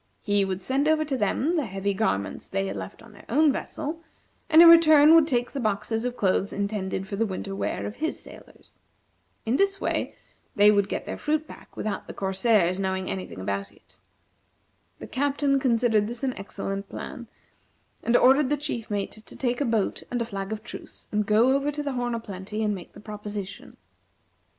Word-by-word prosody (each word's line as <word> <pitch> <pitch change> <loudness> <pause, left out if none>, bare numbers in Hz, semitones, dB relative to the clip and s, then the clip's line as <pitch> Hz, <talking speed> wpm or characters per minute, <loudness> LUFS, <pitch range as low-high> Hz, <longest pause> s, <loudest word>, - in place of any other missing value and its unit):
He 205 -1 +2
would 190 -1 -3
send 270 +7 +1
over 310 0 +3
to 285 -2 -2
them 255 - 0
the 305 -8 0
heavy 195 +1 -2
garments 100 - -1
they 95 - -1
had 95 +1 -4
left 95 - -8
on 230 - -15
their 200 - -15
own 300 +4 +4
vessel, 310 +4 -5 0.5
and 320 0 +7
in 340 - +11
return 315 -2 +8
would 325 -2 +6
take 245 -5 0
the 280 - -4
boxes 225 +1 -1
of 250 0 -3
clothes 195 0 +1
intended 200 -2 -3
for 200 - -5
the 225 - +2
winter 195 0 -5
wear - - -2
of 210 - -6
his 320 +1 -2
sailors. - - -14 0.7
In 235 +4 +1
this 395 0 +2
way, - - -2 0.4
they 205 0 +7
would 200 -1 +2
get - - -3
their - - -6
fruit 305 +1 0
back - - -14
without 215 - -3
the - - -8
corsairs 190 -1 +2
knowing 190 -1 -2
any 190 -1 -4
thing - - -10
about 100 +1 -3
it. 100 - -21 1.0
The - - -9
Captain 280 0 +1
considered 230 -4 +2
this 240 +3 -6
an 260 -2 0
excellent 195 0 -5
plan, 240 -2 -7 0.7
and 240 +1 +3
ordered 265 +1 +5
the 295 - +1
chief 280 -6 -4
mate 205 -1 -2
to - - -13
take 245 0 -1
a - - +2
boat 225 -4 0
and 245 - -2
a 235 - -1
flag 195 -2 -5
of 215 0 -4
truce, - - -8
and 210 -1 0
go 225 +5 +4
over 280 +1 0
to 295 0 -4
the 285 - -2
"Horn 245 -1 -1
o' - - -2
Plenty," 210 0 -5
and 210 -1 +1
make 185 -3 -9
the - - -12
proposition. 205 -2 -7
220 Hz, 205 wpm, -26 LUFS, 195-275 Hz, 1.0 s, in